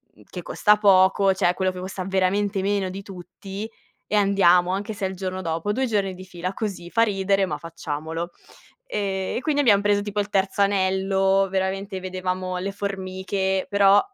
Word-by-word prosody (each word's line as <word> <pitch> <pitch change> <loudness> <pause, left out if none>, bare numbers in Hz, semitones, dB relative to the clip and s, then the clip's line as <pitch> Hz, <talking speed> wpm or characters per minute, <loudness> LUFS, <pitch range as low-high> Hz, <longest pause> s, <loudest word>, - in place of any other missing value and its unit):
mhmm, - - -20
che - - -6
costa 210 - +3
poco. 195 -1 +4
Cioè 185 -2 +2
quello 190 0 0
che 180 - -8
costa 185 0 -5
veramente 195 +1 +1
meno 195 -1 0
di 195 +2 -6
tutti,e 195 +4 -8
andiamo, 195 -3 +4
anche 205 +3 -3
se 200 -2 -3
è - - -5
il 190 - -7
giorno 185 0 -4
dopo, 165 +3 -2
2 265 +4 0
giorni 200 -4 0
di 185 - -10
fila 180 0 -5
così 195 -5 -5
fa 230 - +2
ridere, 195 -2 +1
ma 150 - -3
facciamolo". 165 +1 -5 0.6
Ehm, 195 -2 -2
e - - -3
quindi 290 -1 +1
abbiam 210 -7 +5
preso 205 0 +2
tipo 205 0 -3
il 205 0 -1
terzo 195 0 0
anello, 195 0 +2
veramente 190 +1 -2
vedevamo 185 0 -3
le 195 +2 -3
formiche, 190 -1 -2
però 200 0 +6
195 Hz, 180 wpm, -24 LUFS, 185-200 Hz, 0.6 s, però